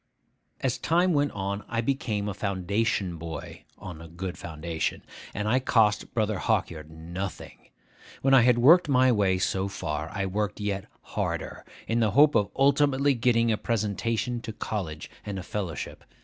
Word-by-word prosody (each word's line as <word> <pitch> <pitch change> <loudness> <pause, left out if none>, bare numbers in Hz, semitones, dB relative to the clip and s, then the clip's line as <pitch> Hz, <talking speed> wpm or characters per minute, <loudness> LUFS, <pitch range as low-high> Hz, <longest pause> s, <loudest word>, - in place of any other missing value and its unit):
As 130 -2 0
time 175 +2 +2
went 145 -1 +2
on, 100 +1 -3
I 115 - -2
became 115 -5 -1
a 105 - -2
Foundation 100 -1 -1
boy 80 -1 -8
on 85 -4 -9
a 80 - -9
good 90 +2 -5
foundation, 80 0 -4 0.3
and 105 +1 -3
I 125 +4 +3
cost 110 -5 +2
Brother 110 -3 0
Hawkyard 75 -2 -1
nothing. 85 +4 -7 0.5
When 135 0 +4
I 135 - +8
had 120 0 +4
worked 155 +7 +6
my 130 -1 +5
way 100 -5 +2
so 95 +1 0
far, 75 -5 -4
I 100 -1 -2
worked 105 +2 -2
yet 100 -2 -2 0.2
harder, - - -3 0.2
in 115 +1 +1
the 110 -2 +3
hope 150 +1 +7
of 105 - +2
ultimately 140 0 +3
getting 115 -2 +2
a 110 - +1
presentation 115 +2 -1
to 115 - -6
college 95 -8 -4 0.2
and 100 -2 -5
a 95 - -5
fellowship. 95 -7 -5
105 Hz, 165 wpm, -27 LUFS, 95-125 Hz, 0.5 s, I